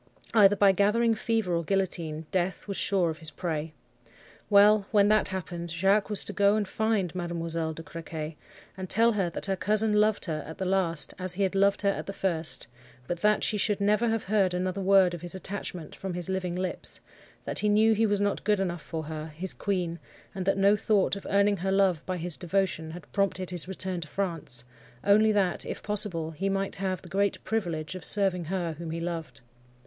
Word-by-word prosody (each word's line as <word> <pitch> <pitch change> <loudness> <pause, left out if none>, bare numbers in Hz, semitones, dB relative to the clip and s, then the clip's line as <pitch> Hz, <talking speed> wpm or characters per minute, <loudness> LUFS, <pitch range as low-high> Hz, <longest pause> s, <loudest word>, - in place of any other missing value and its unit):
Either 205 -3 +6
by 200 -1 +5
gathering 210 +4 +2
fever 220 -4 -1
or 170 0 0
guillotine, 165 -4 -1
death 185 +2 -1
was 200 - -4
sure 185 -5 +1
of 155 - -9
his 160 -2 -1
prey. 160 -3 -4 0.8
Well! 205 0 +5
when 205 -2 +4
that 215 0 +3
happened, 175 -2 -5
Jacques 195 +6 +2
was 210 - +1
to - - -4
go 200 0 +3
and 210 -2 -1
find 220 -4 0
Mademoiselle 165 -2 -2
de 165 - -8
Crequy, 160 -1 -7 0.4
and 185 -1 -7
tell 230 +2 +5
her 195 -5 0
that - - -1
her 195 -1 0
cousin 215 +3 +3
loved 210 0 +2
her 155 -3 -3
at 160 - -8
the 190 - -3
last 180 -4 +1
as 185 -1 -3
he 200 - 0
had 190 - 0
loved 200 +1 +3
her 200 - +3
at - - -6
the 195 - -4
first; 170 -5 -1 0.4
but 175 - -3
that 210 +2 +2
she 215 - +1
should 205 0 0
never 210 +3 +2
have 225 -1 -1
heard 190 -3 +1
another 185 +2 -2
word 190 -2 +4
of 175 - -6
his 175 +1 -3
attachment 185 -4 -6
from 190 -2 -5
his 175 0 0
living 185 -2 -2
lips; 185 0 -2 0.4
that - - +1
he 210 - +1
knew 220 +2 +4
he 220 +1 +2
was 205 -1 +1
not 205 0 -1
good 210 -2 +2
enough 175 -3 -2
for 160 0 -5
her, 155 0 -6
his 165 +4 -4
queen; 175 -4 -2 0.3
and 190 -2 -5
that 195 - +2
no 200 +1 +4
thought 205 -2 +1
of 200 - -8
earning 200 +1 +3
her 190 +2 -2
love 190 -5 +2
by 185 -1 -2
his 175 -1 0
devotion 180 -3 -1
had 170 +1 -9
prompted 190 -2 -1
his 180 -1 -4
return 185 -1 -2
to 155 - -7
France, 165 -9 -3 0.4
only 215 +2 +5
that, 195 -4 +1
if - - -6
possible, 195 -6 +1
he 195 +5 -2
might 195 0 -1
have 190 -2 -3
the - - -11
great 200 0 -1
privilege 175 -8 -2
of 185 -3 -8
serving 190 -3 +1
her 175 -1 -2
whom 170 -1 -6
he 165 +1 -4
loved. 165 -1 -5
190 Hz, 210 wpm, -27 LUFS, 170-200 Hz, 0.8 s, Either